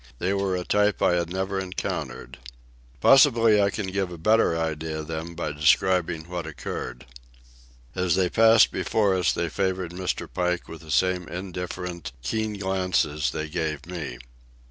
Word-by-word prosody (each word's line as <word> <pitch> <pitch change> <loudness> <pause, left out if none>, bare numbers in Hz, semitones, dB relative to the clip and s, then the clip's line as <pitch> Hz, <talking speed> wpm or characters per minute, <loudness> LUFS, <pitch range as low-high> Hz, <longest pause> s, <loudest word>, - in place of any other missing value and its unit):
They 95 +9 0
were 100 -1 0
a 90 - -2
type 105 0 +2
I - - +4
had 85 -1 0
never 95 +1 -2
encountered. 95 -8 -5 0.6
Possibly 115 -6 +6
I 100 - +3
can 100 +1 -3
give 95 -2 -1
a 85 - -7
better 105 -1 +3
idea 80 -1 -3
of 75 - -9
them 80 +1 -5
by 80 -2 -3
describing 80 +3 +2
what 90 -2 -5
occurred. 65 -4 -6 0.9
As 90 -3 +1
they 95 -1 +2
passed 115 +3 +5
before 105 -4 +1
us 90 -2 +2
they 85 - -1
favoured 95 0 -2
Mr. 90 +1 -3
Pike 90 -1 -2
with 80 - -9
the 80 - -14
same 90 +2 +1
indifferent, 90 -2 -6
keen 110 - -1
glances 90 -6 0
they 75 - -4
gave 75 -1 -3
me. 85 -8 -6
90 Hz, 160 wpm, -25 LUFS, 80-95 Hz, 0.9 s, Possibly